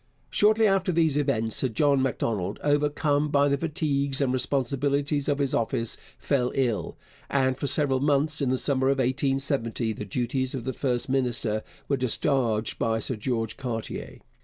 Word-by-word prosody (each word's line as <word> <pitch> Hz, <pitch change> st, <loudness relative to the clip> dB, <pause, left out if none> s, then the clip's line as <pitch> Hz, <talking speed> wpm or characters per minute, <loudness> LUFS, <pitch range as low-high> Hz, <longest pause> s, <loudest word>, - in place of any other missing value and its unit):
Shortly 215 Hz, +2 st, +4 dB
after 195 Hz, -2 st, +2 dB
these 160 Hz, -4 st, +2 dB
events 125 Hz, -7 st, 0 dB
Sir 130 Hz, -, +1 dB
John 140 Hz, +4 st, +2 dB
Macdonald, 105 Hz, -6 st, -1 dB
overcome 145 Hz, 0 st, +1 dB
by 145 Hz, 0 st, +3 dB
the 140 Hz, -, +2 dB
fatigues 140 Hz, -3 st, -1 dB
and 135 Hz, -3 st, +1 dB
responsibilities 140 Hz, +3 st, 0 dB
of 145 Hz, -, +1 dB
his 140 Hz, -2 st, -1 dB
office, 115 Hz, 0 st, 0 dB, 0.2 s
fell 125 Hz, -4 st, 0 dB
ill, 125 Hz, -5 st, -1 dB, 0.3 s
and 130 Hz, -2 st, +2 dB
for 140 Hz, -, -3 dB
several 135 Hz, -3 st, +2 dB
months 145 Hz, +2 st, +1 dB
in 135 Hz, -, +1 dB
the 130 Hz, -, +1 dB
summer 130 Hz, 0 st, +1 dB
of 135 Hz, 0 st, +2 dB
1870 130 Hz, -3 st, 0 dB
the 105 Hz, -, -6 dB
duties 125 Hz, +5 st, -2 dB
of 125 Hz, -, -4 dB
the 130 Hz, +2 st, -3 dB
first 125 Hz, -2 st, -1 dB
minister 120 Hz, -5 st, 0 dB, 0.3 s
were 140 Hz, -, +1 dB
discharged 125 Hz, -3 st, 0 dB
by 115 Hz, 0 st, +1 dB
Sir 120 Hz, +3 st, -2 dB
George 115 Hz, 0 st, -2 dB
Cartier. 120 Hz, -5 st, -5 dB
135 Hz, 160 wpm, -26 LUFS, 120-145 Hz, 0.3 s, Shortly